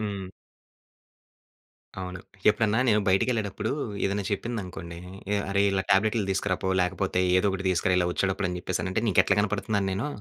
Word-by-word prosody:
హ్మ్. 100 -3 -4 1.7
అవును. 90 0 -5 0.3
ఎప్పుడన్నా 110 +2 +2
నేను 105 0 +4
బయటికెళ్ళేటప్పుడూ 110 0 0 0.3
ఏదన్నా 100 +1 -1
చెప్పిందనుకోండీ, 95 -5 -4 0.4
ఏ - - +3
"అరే 100 0 +2
ఇలా 95 -1 0
టాబ్లెట్లు 105 +2 +3
తీసుకురాపో, 95 -1 -1
లేకపోతే 90 +1 0 0.2
ఏదోకటి 95 0 0
తీసుకురా 90 0 +2
ఇలా 90 - +1
వొచ్చేటప్పుడని" 95 -1 -1
చెప్పేసనంటే, 95 +4 -2
నీకెట్లా 100 0 +3
కనపడతన్నాను 105 -1 -1
నేను? 105 +10 -2
100 Hz, 125 wpm, -27 LUFS, 95-105 Hz, 1.7 s, నేను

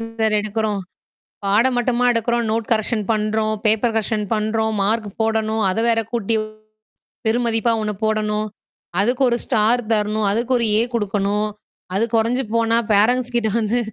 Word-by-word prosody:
Sir 225 -1 -1
எடுக்குறோம்? 215 -1 -2 0.6
பாடம் 225 +6 +3
மட்டுமா 245 0 +1
எடுக்குறோம்? 235 +1 0
நோட் 225 0 -1
கரெக்ஷன் 220 0 0
பண்றோம். 215 0 0
பேப்பர் 220 +2 +2
கரெக்ஷன் 215 -1 -1
பண்றோம். 220 +1 0
மார்க் 215 +1 0
போடணும். 220 0 0
அத 185 - -2
வேற 225 -1 +3
கூட்டி 230 -1 0 0.9
பெருமதிப்பா 230 0 +1
ஒண்ணு 210 -1 -2
போடணும். 215 0 0 0.5
அதுக்கு 245 +6 +1
ஒரு 235 - +1
ஸ்டார் 225 +3 +2
தரணும். 210 0 +1
அதுக்கு 235 +5 0
ஒரு 235 - +1
ஏ - - +4
குடுக்கணும். 205 0 0 0.5
அது 210 - +2
குறைஞ்சு 235 +4 +1
போனா, 230 0 +2
ஃபேரண்ட்ஸ்க்கிட்ட 235 +2 +2
வந்து 220 +3 0
220 Hz, 140 wpm, -20 LUFS, 215-230 Hz, 0.9 s, ஏ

